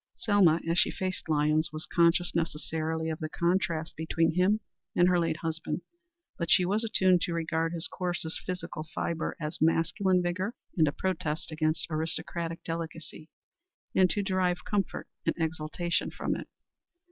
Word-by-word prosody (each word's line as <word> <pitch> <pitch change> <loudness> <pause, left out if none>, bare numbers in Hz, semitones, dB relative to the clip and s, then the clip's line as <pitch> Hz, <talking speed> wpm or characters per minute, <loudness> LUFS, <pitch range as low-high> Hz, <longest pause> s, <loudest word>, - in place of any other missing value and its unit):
Selma, 195 -7 +4
as 170 +2 +3
she - - +4
faced 185 -3 -3
Lyons, 155 +2 +2
was 155 +1 -5
conscious 170 +1 +3
necessarily 160 0 -1
of 155 - -4
the 155 - -3
contrast 170 -1 0
between 160 +1 +1
him 185 +5 +3 0.4
and 175 - +5
her 180 -1 +4
late 165 -2 0
husband. 165 +1 -2 0.6
But 170 -1 -1
she 180 - +6
was 205 +5 +1
attuned 185 -5 +3
to 175 - -1
regard 165 0 0
his 170 0 -1
coarser 175 -3 -2
physical 180 -3 -5
fibre 165 -1 -1
as 150 -1 -4
masculine 180 +3 +3
vigor 185 +6 -1 0.2
and 160 -5 +4
a - - +2
protest 160 -3 -2
against 155 0 0
aristocratic 165 +1 -3
delicacy, 165 -1 -6 0.6
and 185 -1 +5
to 205 - 0
derive 185 -2 0
comfort 200 -3 -1 0.2
and - - +2
exaltation 160 +1 -1
from - - -2
it. - - -6
165 Hz, 155 wpm, -29 LUFS, 160-180 Hz, 0.6 s, she